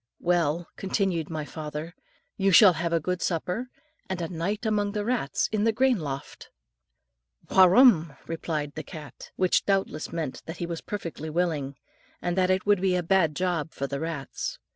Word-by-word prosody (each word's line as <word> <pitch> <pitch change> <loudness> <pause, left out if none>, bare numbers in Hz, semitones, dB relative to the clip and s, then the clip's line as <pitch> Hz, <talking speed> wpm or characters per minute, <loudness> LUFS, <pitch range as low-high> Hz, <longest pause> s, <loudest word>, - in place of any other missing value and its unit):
"Well," 170 -1 +1
continued 190 -5 -1
my 155 -2 -4
father, 155 +2 -6 0.4
"you 195 -2 +2
shall 190 +1 +8
have 170 +1 -2
a 165 - +3
good 180 +3 -2
supper, 180 +8 -2 0.4
and 190 -1 -2
a 170 - -2
night 190 +6 -3
among 205 -2 +1
the 210 -1 -2
rats 230 - 0
in 215 -1 0
the 225 - +4
grain 250 0 +2
loft." 140 -3 -6 1.0
"Wurram!" 185 - +6
replied 155 -3 -3
the 155 - -5
cat, 145 -2 -10
which 185 -1 +2
doubtless 195 -6 -1
meant 160 -5 -4
that 160 +1 -6
he 175 - -3
was 170 -1 -5
perfectly 170 -6 -5
willing, 155 -5 -1 0.4
and 175 0 -2
that 185 -1 +2
it 185 0 +1
would 205 -2 +3
be 190 -1 +2
a 180 - 0
bad 170 -4 +2
job 175 -3 -1
for 140 - -2
the 140 0 -3
rats. 160 -4 -4
175 Hz, 175 wpm, -27 LUFS, 155-195 Hz, 1.0 s, shall